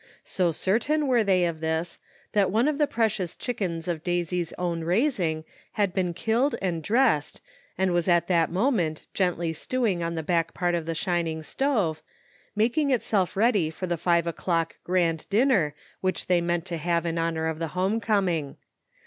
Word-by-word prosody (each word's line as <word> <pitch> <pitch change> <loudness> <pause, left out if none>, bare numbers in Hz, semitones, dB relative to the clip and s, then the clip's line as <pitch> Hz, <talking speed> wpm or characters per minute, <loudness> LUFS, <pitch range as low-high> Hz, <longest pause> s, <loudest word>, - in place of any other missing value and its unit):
So 180 -3 0
cer 190 +7 +1
tain 300 +4 0
were 245 -4 +3
they 185 -3 +3
of 165 -2 -2
this, 160 +2 -2 0.3
that 200 -2 +3
one 225 +7 +2
of 305 -1 0
the 295 - +3
precious 215 -8 -1
chickens 180 -9 -3
of 170 -3 -2
Daisy's 175 -1 -1
own 170 -2 -2
raising, 175 - 0 0.3
had 200 -4 0
been 180 -3 -1
killed 230 - +1
and 175 -4 -2
dressed, 220 - +2 0.4
and 190 0 +1
was 175 0 +1
at 175 -1 +3
that 170 -3 +2
moment 180 - 0
gently 175 -3 0
stewing 215 -1 -1
on 170 0 -2
the 160 - -3
back 165 0 0
part 175 -1 0
of 170 -2 -2
the 165 - -2
shining 165 -2 -1
stove, 205 - 0 0.5
making 245 +8 +2
itself 210 -8 +1
ready 205 -7 +3
for 160 +4 -5
the 175 -1 -1
five 170 0 +2
o'clock 165 0 -1
grand 170 -3 0
dinner 205 - +3 0.2
which 185 0 -2
they 180 -1 +2
meant 170 -1 -1
to 170 - -4
have 170 +1 0
in 165 0 -1
honor 165 -1 -1
of 160 -1 -2
the 165 - -1
home 195 +5 +1
coming. 185 -9 0
175 Hz, 180 wpm, -26 LUFS, 165-210 Hz, 0.5 s, were